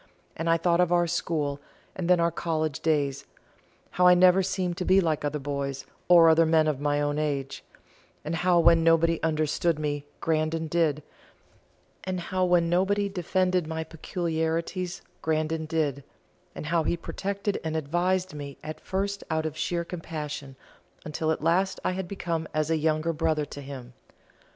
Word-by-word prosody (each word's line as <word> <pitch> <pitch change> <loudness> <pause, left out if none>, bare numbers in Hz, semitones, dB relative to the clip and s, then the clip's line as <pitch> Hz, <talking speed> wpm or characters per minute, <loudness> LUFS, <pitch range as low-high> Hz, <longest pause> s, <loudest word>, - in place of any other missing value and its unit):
and 165 +1 -2
I 165 - +4
thought 170 +1 +2
of 180 -1 +3
our 175 0 +4
school 155 -4 -1 0.4
and 180 -2 -3
then 180 -1 +5
our 170 0 +2
college 155 -3 -2
days 140 -4 0 0.7
how 180 0 +4
I 180 - +8
never 185 +1 +6
seemed 185 -2 -1
to - - -2
be 185 +1 +4
like 160 -5 0
other 145 +1 -1
boys 140 -1 -4 0.2
or 170 -2 +7
other 160 0 +5
men 160 -1 +4
of 150 -3 0
my 145 0 0
own 145 0 0
age 140 -3 -3 0.6
and 165 +2 -2
how 175 0 +3
when 165 0 +5
nobody 165 0 +3
understood 155 +1 +1
me 145 -1 -3
Grandon 160 0 0
did, 155 -2 +1 1.0
and 185 -1 -3
how 185 +2 -1
when 175 -1 +3
nobody 195 +4 +1
defended 185 -2 0
my 160 0 -3
peculiarities 165 +2 -3 0.2
Grandon 160 0 -1
did 150 -4 -1 0.6
how 165 +2 +1
he 165 +2 0
protected 200 +3 -3
and 160 0 -2
advised 180 +4 0
me 140 -2 -7
at 155 0 -7
first 200 +1 -2
out 160 0 0
of 155 -1 -3
sheer 170 +1 -2
compassion, 150 -5 -6 0.5
until 155 +1 -2
at 160 - -1
last 185 +4 +1
I - - +2
had 185 0 -4
become 170 -4 -3
as 155 +1 0
a - - +3
younger 155 +1 0
brother 155 -1 0
to 145 - -9
him. 130 -3 -9
165 Hz, 165 wpm, -27 LUFS, 155-175 Hz, 1.0 s, I